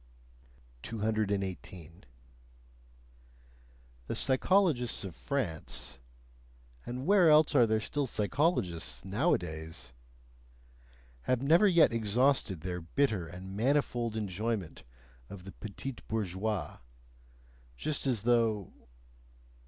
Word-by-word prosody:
218. 100 - -3 2.0
The - - -3
psychologists 135 - +2
of 95 -4 -6
France 120 - -3 0.9
and 125 +2 -4
where 190 -3 +5
else 155 0 +5
are 125 -5 +5
there 110 0 +2
still 140 +5 -2
psychologists 105 - -1
nowadays? 80 - -2 1.3
have 130 0 +1
never 165 +9 +5
yet 170 -9 +5
exhausted 115 - +1
their 90 +1 -4
bitter 100 0 0
and 90 +3 -9
manifold 120 -2 0
enjoyment 105 - -3 0.5
of 95 -3 -9
the 95 - -10
betise 120 +5 -6
bourgeoise, 105 -1 -2 1.0
just 150 - -3
as 120 -6 0
though... 115 -4 +1
110 Hz, 90 wpm, -31 LUFS, 95-135 Hz, 2.0 s, where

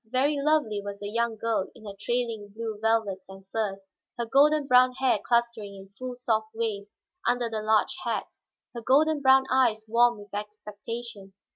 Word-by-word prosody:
Very 270 +5 +2
lovely 285 -9 +1
was 200 0 -6
the 205 0 -5
young 235 0 -1
girl 220 -3 -1
in 220 - -15
her 200 - -6
trailing 230 -1 -2
blue 220 -2 -5
velvets 215 -4 0
and 190 0 -12
furs; 195 -3 -3 0.3
her 235 - -1
golden 290 +4 +4
brown 255 -1 +5
hair 255 -4 +1
clustering 235 -4 0
in 195 0 -12
full, 250 +5 -7
soft 220 -3 -1
waves 210 -3 -4 0.3
under 245 -1 +1
the 220 -1 -2
large 215 0 +2
hat, - - -1 0.5
her 235 - -6
golden 295 +5 +3
brown 265 0 +5
eyes 235 -5 +2
warm 240 +1 +3
with 205 -1 -14
expectation. 210 0 -7
225 Hz, 170 wpm, -27 LUFS, 205-250 Hz, 0.5 s, brown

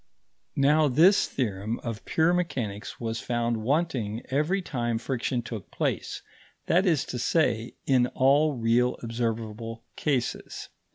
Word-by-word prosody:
Now 150 +2 +4
this 165 +10 +5
theorem 110 -2 -2
of 115 -2 -5
pure 160 +2 +2
mechanics 125 - -3
was 115 -1 -3
found 120 -1 -1
wanting 120 -3 -1
every 155 +8 +1
time 120 -10 -2
friction 125 0 -2
took 110 -5 -7
place - - -2 0.4
that 185 +4 +3
is 160 -6 +2
to 125 - -5
say, 120 -5 +1
in 125 -3 +3
all 145 +3 +4
really 120 +1 +2
observable 115 -1 -3
cases. 135 -6 -2
125 Hz, 125 wpm, -27 LUFS, 115-150 Hz, 0.4 s, this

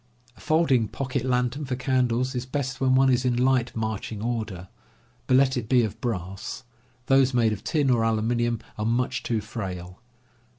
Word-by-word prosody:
A - - -20
folding 150 -8 +2
pocket 130 +2 -3
lantern 125 +2 0
for 130 -1 -2
candles 130 0 0
is 125 -1 -2
best 135 -1 -3
when 130 -1 +3
one 135 0 +5
is 125 0 +2
in 125 -2 +1
light 125 -1 +2
marching 110 -1 -3
order; 110 -5 -3 0.6
but 130 - +5
let 130 0 +3
it 115 -3 -4
be 125 -2 +4
of 110 - -4
brass; 95 -5 -4 0.4
those 135 -1 +4
made 115 -3 +3
of 105 - -7
tin 145 -4 +1
or 120 -2 +3
aluminum 115 +1 +1 0.2
are 105 - -1
much 125 +2 0
too 115 -2 -1
frail. 95 -4 -6
120 Hz, 175 wpm, -25 LUFS, 110-130 Hz, 0.6 s, one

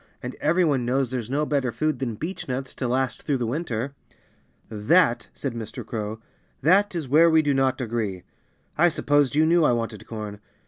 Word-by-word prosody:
And 125 +1 -4
every 170 +4 +3
one 140 -5 +1
knows 130 +1 0
there's 120 -3 -3
no 145 +3 0
better 140 -4 0
food 155 0 -1
than 120 -4 -2
beechnuts 135 - -4
to 125 - -1
last 130 +1 -1
through 140 - 0
the 120 - -2
winter." 130 -1 -3 0.7
"That 120 - +2
" - - -41
said 135 -4 -3
Mr. 115 0 -7
Crow 110 -1 -4 0.4
"that 195 +4 +4
is 160 -5 -3
where 160 +6 +6
we 160 -1 +4
do 145 -1 +2
not 135 0 +1
agree. 110 -7 -3 0.6
I 175 +2 +6
supposed 145 -3 +2
you 155 +1 +4
knew 170 +1 +4
I 135 - +4
wanted 115 -2 -4
corn. 105 -2 -6
130 Hz, 190 wpm, -24 LUFS, 115-155 Hz, 0.7 s, where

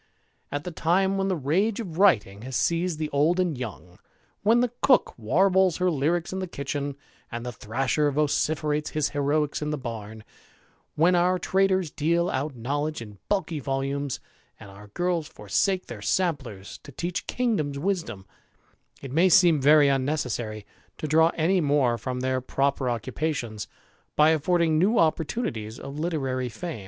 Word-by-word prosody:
At 145 +1 -3
the 180 - -5
time 185 +4 +1
when 195 - 0
the 190 - +1
rage 180 - 0
of 180 -7 -6
writing 105 - +3
has 130 +2 -6
seized 170 +2 0
the 155 -1 -3
old 155 +6 +2
and 175 -4 +1
young, 95 -8 -8 0.4
when 225 +4 +4
the 245 -2 0
cook 260 -3 +4
warbles 185 - +2
her 180 0 +1
lyricks 165 +4 0
in 190 - -3
the 185 - -3
kitchen, 140 -2 -4 0.4
and 120 0 -5
the 125 - -3
thrasher 130 +7 0
vociferates 150 +1 0
his 150 -2 0
heroicks 145 +1 0
in 150 - -2
the 150 - -2
bam; 110 -4 -7 0.7
when 170 +4 +4
our 180 +1 +3
traders 190 -2 +1
deal 170 +3 +1
out 135 +1 -2
knowledge 145 +6 -2
in 105 -3 -10
bulky 190 -6 -1
volumes, 135 0 -2 0.4
and 100 -3 -12
oar 100 +2 -13
girls 175 -3 0
forsake 180 - -1
their 110 -4 -9
samplers 130 - -2
to - - -12
teach 175 +5 -4
kingdoms 205 - -1
wisdom 145 - -3 0.4
] - - -34
it 135 - -6
may 170 +6 +4
seem 175 -6 +5
very 145 +1 +6
unnecessary 130 -6 -1 0.3
to - - -5
draw 160 +2 +5
any 175 +3 +2
more 140 -5 +2
from 125 -1 -4
their 130 0 0
proper 135 0 0
occupations, 120 -2 -3 0.5
by 150 +1 +5
affording 160 0 +2
new 210 +7 +3
opportunities 155 - -1
of 140 +2 -7
literary 135 -6 -2
fame. 165 +2 -6
150 Hz, 160 wpm, -26 LUFS, 130-175 Hz, 0.7 s, very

